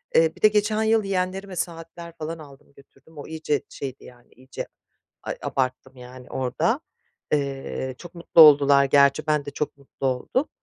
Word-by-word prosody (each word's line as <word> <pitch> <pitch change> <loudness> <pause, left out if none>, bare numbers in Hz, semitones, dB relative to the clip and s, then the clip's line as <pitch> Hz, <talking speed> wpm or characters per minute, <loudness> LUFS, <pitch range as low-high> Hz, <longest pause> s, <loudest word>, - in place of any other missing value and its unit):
Eee, 160 0 +4
bir - - -18
de 215 - +8
geçen 215 +1 +1
yıl 220 -1 +3
yeğenlerime 190 0 -2
saatler 170 0 -6
falan 160 +1 -5
aldım, 140 -1 -15
götürdüm, 140 +3 -21
o 145 - -8
iyice 155 -2 -2
şeydi, 135 -1 -7
yani, 120 -1 -17
iyice, 130 +1 -8 0.6
ay, - - -4
abarttım, 130 0 -3
yani, 125 0 -12
orada. 130 -2 0 0.5
Eee, 135 -2 -2
çok 175 0 -12
mutlu 170 -1 +4
oldular 140 -2 +7
gerçi, 140 +2 +3
ben 150 -2 +1
de 145 - -6
çok 150 -1 -4
mutlu 135 -1 -5
oldum. 130 - -1
145 Hz, 165 wpm, -24 LUFS, 135-170 Hz, 0.6 s, de